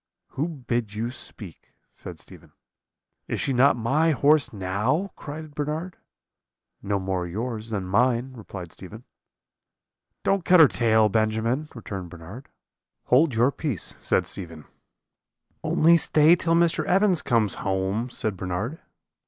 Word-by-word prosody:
"'Who 145 Hz, +5 st, -2 dB
bid 120 Hz, -8 st, -3 dB
you 115 Hz, +3 st, -2 dB
speak?' 105 Hz, -8 st, -12 dB, 0.2 s
said -, -, -10 dB
Stephen. -, -, -16 dB, 0.7 s
"'Is -, -, -3 dB
she 135 Hz, -, 0 dB
not 130 Hz, +2 st, +4 dB
my 140 Hz, +8 st, +1 dB
horse 145 Hz, 0 st, +3 dB
now?' 105 Hz, -, -1 dB
cried 155 Hz, +1 st, -8 dB
Bernard. 155 Hz, +4 st, -4 dB, 0.9 s
"'No 100 Hz, 0 st, -1 dB
more 95 Hz, -2 st, -2 dB
yours 110 Hz, +4 st, -5 dB
than 100 Hz, -4 st, -3 dB
mine,' 125 Hz, +6 st, +1 dB
replied 100 Hz, -7 st, -9 dB
Stephen. 105 Hz, +5 st, -11 dB, 1.2 s
"'Don't 195 Hz, -2 st, +1 dB
cut 180 Hz, 0 st, +5 dB
her 160 Hz, -, +9 dB
tail, 110 Hz, -3 st, +3 dB
Benjamin,' 110 Hz, +7 st, 0 dB
returned 100 Hz, -6 st, -7 dB
Bernard. 95 Hz, +10 st, -11 dB, 0.5 s
"'Hold 135 Hz, +1 st, +3 dB
your 120 Hz, +4 st, +3 dB
peace,' 140 Hz, -, -3 dB
said -, -, +1 dB
Stephen. 80 Hz, -5 st, -5 dB, 1.0 s
"'Only 170 Hz, +2 st, +4 dB
stay 155 Hz, +1 st, +4 dB
till 165 Hz, -1 st, 0 dB
Mr. 170 Hz, -1 st, +2 dB
Evans 190 Hz, -2 st, +3 dB
comes 115 Hz, -6 st, +1 dB
home,' 95 Hz, +5 st, -1 dB
said 110 Hz, -4 st, -2 dB
Bernard. 95 Hz, -, -4 dB
120 Hz, 130 wpm, -25 LUFS, 100-150 Hz, 1.2 s, her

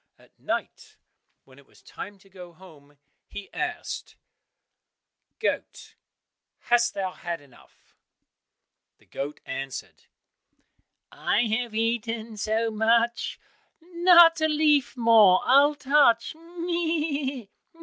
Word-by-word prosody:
At -, -, -25 dB
night -, -, -5 dB, 0.5 s
when 130 Hz, +1 st, -20 dB
it 140 Hz, -, -21 dB
was -, -, -24 dB
time 205 Hz, 0 st, -9 dB
to 195 Hz, -, -23 dB
go 180 Hz, -2 st, -13 dB
home 150 Hz, -5 st, -18 dB, 0.3 s
he 205 Hz, -, -10 dB
asked, 350 Hz, -1 st, -5 dB, 1.2 s
"Goat, -, -, -4 dB, 0.6 s
hast 240 Hz, 0 st, +1 dB
thou 190 Hz, -2 st, -3 dB
had 170 Hz, -2 st, -6 dB
enough?" 140 Hz, -3 st, -23 dB, 1.0 s
The -, -, -27 dB
goat 145 Hz, +2 st, -7 dB
answered, 135 Hz, -1 st, -7 dB, 1.1 s
"I 210 Hz, -, 0 dB
have 225 Hz, 0 st, -2 dB
eaten 225 Hz, 0 st, -2 dB
so 220 Hz, +2 st, -1 dB
much, 230 Hz, +2 st, 0 dB, 0.4 s
Not 340 Hz, -1 st, +5 dB
a 315 Hz, -, +3 dB
leaf 300 Hz, -4 st, +1 dB
more 225 Hz, -6 st, +5 dB
I'll 285 Hz, +3 st, +5 dB
touch, 275 Hz, -5 st, +2 dB
meh! 325 Hz, -6 st, -3 dB
230 Hz, 105 wpm, -25 LUFS, 195-300 Hz, 1.2 s, Not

